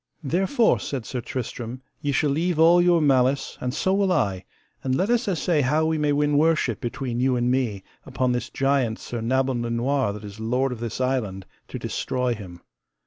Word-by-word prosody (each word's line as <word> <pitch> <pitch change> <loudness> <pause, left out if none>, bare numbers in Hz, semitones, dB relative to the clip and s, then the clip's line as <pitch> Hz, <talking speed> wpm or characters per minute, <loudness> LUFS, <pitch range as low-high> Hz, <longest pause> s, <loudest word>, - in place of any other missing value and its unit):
Therefore, 190 - +2
said 130 -5 -4
Sir 125 - -4
Tristram, 125 +1 -5 0.2
ye 145 - -1
shall 140 +1 +1
leave 165 +3 0
all 170 +2 +6
your 175 -1 +4
malice, 135 -1 +2
and 125 - -1
so 190 +8 0
will 195 -1 +2
I, 100 - 0 0.4
and 130 -1 0
let 190 - +1
us 240 +1 +1
assay 170 -4 +1
how 150 +4 +2
we 160 -1 0
may 150 -1 +2
win 145 0 +2
worship 155 -8 +1
between 120 0 -3
you 130 0 +2
and 120 0 +1
me 120 -7 -1 0.2
upon 130 -1 -1
this 125 0 -2
giant 135 -5 +1
Sir 120 -2 -6
Nabon 130 +1 0
le 120 - -3
Noire 125 0 0
that 105 0 -9
is 105 +1 -9
lord 125 +4 0
of 125 - -5
this 115 0 -4
island, 115 -8 -1 0.2
to - - -6
destroy 125 -1 -2
him. 90 -6 -10
130 Hz, 200 wpm, -24 LUFS, 120-150 Hz, 0.4 s, all